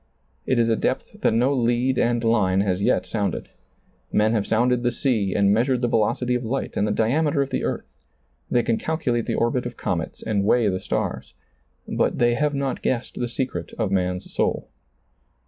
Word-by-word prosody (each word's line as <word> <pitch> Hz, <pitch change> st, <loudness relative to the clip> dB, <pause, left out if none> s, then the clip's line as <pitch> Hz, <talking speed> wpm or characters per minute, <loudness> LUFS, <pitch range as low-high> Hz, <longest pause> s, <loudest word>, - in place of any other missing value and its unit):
It 130 Hz, -, +2 dB
is 115 Hz, -1 st, +3 dB
a 115 Hz, -, +3 dB
depth -, -, -3 dB
that -, -, +3 dB
no 125 Hz, +5 st, +2 dB
lead 125 Hz, +1 st, +1 dB
and 120 Hz, 0 st, +1 dB
line 100 Hz, -5 st, +3 dB
has 95 Hz, -1 st, 0 dB
yet -, -, +2 dB
sounded. 105 Hz, -3 st, -2 dB, 0.6 s
Men 110 Hz, +1 st, +3 dB
have 105 Hz, -3 st, 0 dB
sounded 120 Hz, +2 st, +2 dB
the 120 Hz, -, +2 dB
sea 115 Hz, -6 st, 0 dB
and 100 Hz, 0 st, +4 dB
measured 125 Hz, +3 st, +1 dB
the -, -, +3 dB
velocity 120 Hz, +2 st, +1 dB
of 125 Hz, 0 st, -1 dB
light 130 Hz, +4 st, -3 dB
and 105 Hz, -, +1 dB
the -, -, 0 dB
diame 135 Hz, +9 st, +1 dB
ter 140 Hz, -2 st, +2 dB
of 135 Hz, -, -8 dB
the -, -, -1 dB
earth; -, -, -2 dB, 0.6 s
they 120 Hz, -, +2 dB
can 115 Hz, 0 st, +1 dB
calculate 130 Hz, -8 st, -1 dB
the -, -, 0 dB
orbit 120 Hz, +1 st, 0 dB
of 120 Hz, -, -9 dB
comets 85 Hz, -3 st, -3 dB
and 105 Hz, -3 st, 0 dB
weigh 115 Hz, +2 st, +3 dB
the 95 Hz, -1 st, -1 dB
stars; -, -, -3 dB, 0.5 s
but -, -, 0 dB
they 120 Hz, 0 st, +3 dB
have 145 Hz, +3 st, 0 dB
not 140 Hz, -1 st, -2 dB
guessed 125 Hz, -1 st, -2 dB
the 120 Hz, -, -1 dB
secret 130 Hz, +2 st, -4 dB
of 110 Hz, -4 st, -1 dB
man's 90 Hz, -1 st, -1 dB
soul. -, -, -1 dB
120 Hz, 200 wpm, -23 LUFS, 105-125 Hz, 0.6 s, and